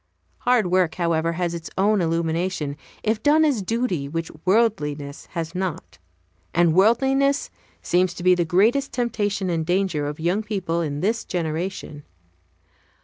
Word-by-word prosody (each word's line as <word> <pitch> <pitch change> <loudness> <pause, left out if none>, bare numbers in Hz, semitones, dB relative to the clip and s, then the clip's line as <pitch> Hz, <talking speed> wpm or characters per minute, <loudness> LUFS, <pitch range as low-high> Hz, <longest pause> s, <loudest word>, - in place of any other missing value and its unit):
Hard 245 -4 +3
work, 185 -3 +2
however, 170 -2 0
has 170 0 -2
its 165 -1 -6
own 205 +1 +3
illumination 165 -2 -1 0.3
if 220 0 0
done 310 +2 +4
as 275 -8 +1
duty 190 - -1
which 165 +2 -4
worldliness 150 -9 0
has 165 0 -4
not; 180 - -4 0.6
and 170 -1 +4
worldliness 270 - +3 0.3
seems 180 0 +1
to 175 - -7
be 185 0 +6
the 175 -1 +2
greatest 215 +12 +2
temptation 205 -6 -1
and 165 -1 0
danger 175 -4 0
Of 145 +1 -5
young 175 +6 +1
people 190 -6 -2
in 145 -2 -3
this 225 +4 0
generation. 165 -2 -4
180 Hz, 145 wpm, -23 LUFS, 165-215 Hz, 0.6 s, be